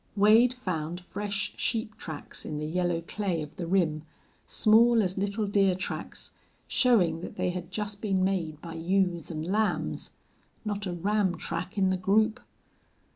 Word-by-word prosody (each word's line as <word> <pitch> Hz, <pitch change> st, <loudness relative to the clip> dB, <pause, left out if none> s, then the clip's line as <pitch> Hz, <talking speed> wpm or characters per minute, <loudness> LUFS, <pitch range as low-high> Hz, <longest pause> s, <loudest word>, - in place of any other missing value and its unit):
Wade 220 Hz, +5 st, +5 dB
found 175 Hz, -7 st, -3 dB
fresh 200 Hz, +2 st, -3 dB
sheep 220 Hz, -2 st, -1 dB
tracks 155 Hz, -3 st, -7 dB
in 150 Hz, -, -4 dB
the 150 Hz, -, -3 dB
yellow 175 Hz, +1 st, 0 dB
clay 180 Hz, -2 st, -2 dB
of 150 Hz, -, -11 dB
the 175 Hz, -, -4 dB
rim, 165 Hz, -4 st, +2 dB, 0.5 s
small 225 Hz, +1 st, +5 dB
as 185 Hz, -1 st, -2 dB
little 200 Hz, +2 st, -1 dB
deer 195 Hz, -2 st, +3 dB
tracks, 185 Hz, -, -6 dB, 0.4 s
showing 190 Hz, -11 st, +3 dB
that -, -, -7 dB
they 180 Hz, -, 0 dB
had 175 Hz, -1 st, -6 dB
just 205 Hz, 0 st, -4 dB
been 195 Hz, -3 st, +1 dB
made 170 Hz, -6 st, -1 dB
by 165 Hz, -1 st, -7 dB
ewes 175 Hz, 0 st, 0 dB
and 160 Hz, -2 st, -4 dB
lambs. 210 Hz, +4 st, -1 dB, 0.5 s
Not 205 Hz, -1 st, -2 dB
a 180 Hz, -, -2 dB
ram 190 Hz, 0 st, +1 dB
track 170 Hz, +4 st, -4 dB
in 190 Hz, -1 st, +3 dB
the 185 Hz, -, +1 dB
group! 215 Hz, +4 st, +2 dB
190 Hz, 160 wpm, -28 LUFS, 170-210 Hz, 0.5 s, Wade